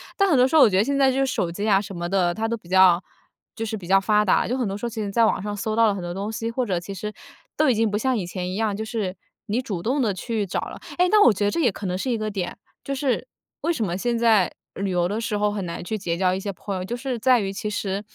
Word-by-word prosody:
但 395 -1 +3
很 305 - +4
多 250 +1 +5
时 275 - -1
候 310 - +8
我 - - +8
觉 185 - +1
得 195 - +5
现 280 +4 0
在 270 -1 +4
就 260 - -1
是 270 - +3
手 180 -10 -1
机 200 +5 -4
呀 200 -2 +4
什 200 - -8
么 175 -1 -4
的， 180 -2 +1
它 220 +4 -2
都 230 - -1
比 195 -6 -15
较 185 -1 +5 0.5
就 225 - -4
是 220 0 -3
比 195 -5 -8
较 195 +2 +4
发 210 +1 +3
达， 200 - +2
就 250 - -1
很 250 - 0
多 195 -1 -3
时 210 - -5
候 - - -1
其 225 -1 -5
实 200 - -4
在 230 +3 +4
网 195 - 0
上 205 0 -4
搜 215 +1 -2
到 230 0 +5
了 210 - +2
很 195 - -5
多 175 0 -4
东 200 +3 -4
西， 225 0 -3
或 245 +2 -1
者 185 -5 -1
其 175 +3 -7
实， 210 +3 -5 0.4
都 310 - +4
已 250 - +3
经 220 -1 +1
不 205 - 0
像 255 +3 +1
以 190 - -2
前 180 0 -4
一 185 - -4
样， 215 0 0
就 220 +2 -4
是， 215 -5 -3 0.3
你 225 +4 0
主 195 -9 -5
动 265 +7 +1
地 215 -5 +1
去 215 +2 -2
找 185 - -2
了。 - - -7 0.2
哎， 360 +1 +4
那 425 -1 +6
我 235 - +7
觉 205 - -2
得 205 - +2
这 - - -1
也 275 -7 +4
可 205 0 -7
能 180 -1 -1
是 255 - -3
一 240 - +1
个 215 -1 -3
点， 185 -4 -4 0.3
就 275 - -2
是， 270 - -1 0.3
为 340 - +1
什 230 -9 -1
么 175 -1 -2
现 240 +4 0
在 225 -5 +4 0.3
旅 195 0 -2
游 175 -1 +1
的 210 +3 -2
时 230 -2 -2
候， 210 0 +1
很 205 -2 -3
难 170 - -5
去 215 +5 -3
结 175 -4 -2
交 185 +1 +2
一 190 - -2
些 200 0 -4
朋 200 +2 -6
友， 185 - -4
就 235 - -3
是 250 -1 -4
在 250 +1 +4
于， 195 -1 -2
其 210 +2 -4
实 200 -2 -2
210 Hz, 355 characters per minute, -24 LUFS, 190-235 Hz, 0.5 s, 候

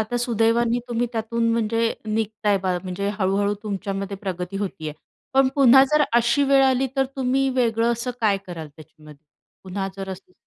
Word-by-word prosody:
आता 220 +3 -2
सुदैवाने 235 0 +1
तुम्ही 240 0 0
त्यातून 230 +1 -1
म्हणजे 230 0 +1
निघताय 215 -1 0
बा 185 -1 -1
म्हणजे 190 +2 -3
हळू-हळू 200 +1 +1
तुमच्यामध्ये 195 -1 -4
प्रगती 185 -1 -5
होतीय. 180 -6 -4 0.4
पण 270 -1 +5
पुन्हा 265 -1 +7
जर 300 0 +4
अशी 235 +4 +3
वेळ 275 0 +4
आली 265 0 +2
तर 270 - +3
तुम्ही 265 +1 +1
वेगळं 230 -1 +2
असं 235 +2 -3
काय 210 -3 +3
कराल 165 -4 -7
त्याच्यामध्ये? 150 0 -16 0.4
पुन्हा 195 +1 -3
जर 195 0 -6
असं 190 -1 -10
220 Hz, 160 wpm, -23 LUFS, 195-240 Hz, 0.4 s, पुन्हा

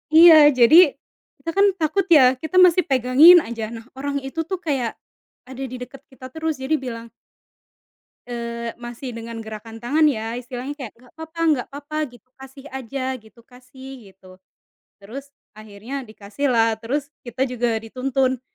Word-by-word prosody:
Iya, 330 0 +9 0.2
jadi, 300 +6 +7 0.4
kita 330 - -7
kan 395 +3 +3
takut 325 +5 0
ya, 260 -6 +5
kita 320 +4 -7
masih 360 -1 +5
pegangin 275 +7 +6
saja. 225 -2 -5
Nah, 225 0 -11
orang 280 0 -4
itu 270 +5 -7
tuh 380 - -2
kayak, 270 -9 -2 0.5
ada 260 +1 -8
di 255 -1 -6
deket 265 +2 -11
kita 255 0 -11
terus 320 -2 -4
jadi 275 +4 0
bilang 235 -3 -7 1.2
eee, 235 -1 -6
masih 240 +1 -8
dengan 230 0 -8
gerakan 220 +1 -9
tangan 290 +7 0
ya, 230 -6 0
istilahnya 250 +3 -7
kayak, 260 -7 -8
"Enggak 250 0 -21
apa-apa 320 +1 -10
enggak 290 -6 +1
apa-apa," 290 +2 -7
gitu, 245 0 -19
"kasih 270 +1 -14
aja," 265 +1 -4
gitu, 220 -1 -17
"kasih," 255 +1 -14 0.2
gitu. 185 0 -18 0.6
Terus 255 +8 -10 0.2
akhirnya 215 +5 -8
dikasih 220 +3 -5
lah, 230 -2 +2
terus 280 +5 -4
kita 245 +2 -3
juga 245 -3 -2
dituntun. 255 +3 -2
255 Hz, 155 wpm, -21 LUFS, 235-285 Hz, 1.2 s, Iya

